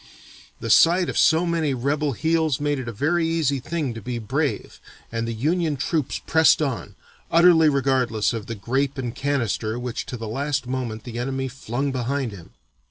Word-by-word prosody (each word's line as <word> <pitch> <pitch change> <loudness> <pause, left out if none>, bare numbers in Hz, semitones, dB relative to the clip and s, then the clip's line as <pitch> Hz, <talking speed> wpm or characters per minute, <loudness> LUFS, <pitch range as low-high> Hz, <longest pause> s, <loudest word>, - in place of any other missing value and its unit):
The 115 - -2
sight 175 +6 +5
of - - -4
so 165 +2 +4
many 165 -5 0
rebel 140 +3 0
heels 160 0 +1
made 145 -1 0
it 130 - -6
a - - -3
very 160 +9 +1
easy 155 -4 +1
thing 155 -2 -3
to 115 - -8
be 120 +3 -4
brave, 110 -3 -2 0.3
and 115 0 -2
the - - -2
Union 155 +6 0
troops 145 +1 -1
pressed 160 0 +4
on, 130 -9 -3 0.3
utterly 165 -2 +6
regardless 130 -6 +1
of 115 -2 -5
the 115 - -4
grape 130 +7 -1
and 125 -3 -3
canister 120 -5 -1
which 125 -1 -4
to 125 - -5
the 115 -1 -6
last 140 +5 -2
moment 125 -4 -4
the 120 -1 -6
enemy 135 +1 -2
flung 135 +1 -3
behind 130 0 -2
him. 90 -5 -12
135 Hz, 180 wpm, -23 LUFS, 120-155 Hz, 0.3 s, utterly